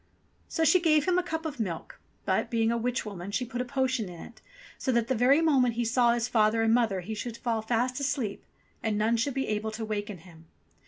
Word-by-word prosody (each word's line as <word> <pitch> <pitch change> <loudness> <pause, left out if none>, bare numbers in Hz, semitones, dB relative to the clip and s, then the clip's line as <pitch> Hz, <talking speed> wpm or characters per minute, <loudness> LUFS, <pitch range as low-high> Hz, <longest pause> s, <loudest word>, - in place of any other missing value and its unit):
So 325 - -1
she 365 +3 +5
gave 310 -4 +3
him 365 -1 +3
a - - +2
cup 320 -2 -4
of 290 -4 -5
milk; 180 -7 -4 0.3
but, - - 0
being 225 -1 +1
a 235 - 0
witch 245 +1 -1
woman, 195 -3 -6
she 250 +5 -1
put 245 0 -4
a - - -3
potion 260 -4 -1
to 180 - -8
it 175 +7 -12 0.4
so 260 - 0
that 235 -2 +1
the - - +3
very 260 +6 +4
moment 260 -7 +3
he 240 0 0
saw 240 0 +3
his 240 0 -1
father 225 -1 +2
and 225 0 +3
mother 225 -6 +2
he 210 +5 -5
should 230 +2 -5
fall 230 -2 -1
fast 245 +3 0
asleep, 265 -7 -2 0.4
and 220 -2 -1
none 220 +2 +2
should 235 +4 -1
be 270 - -1
able 215 +1 -1
to 220 +1 -5
waken 210 -2 -4
him. 165 -1 -17
235 Hz, 235 wpm, -28 LUFS, 215-260 Hz, 0.4 s, she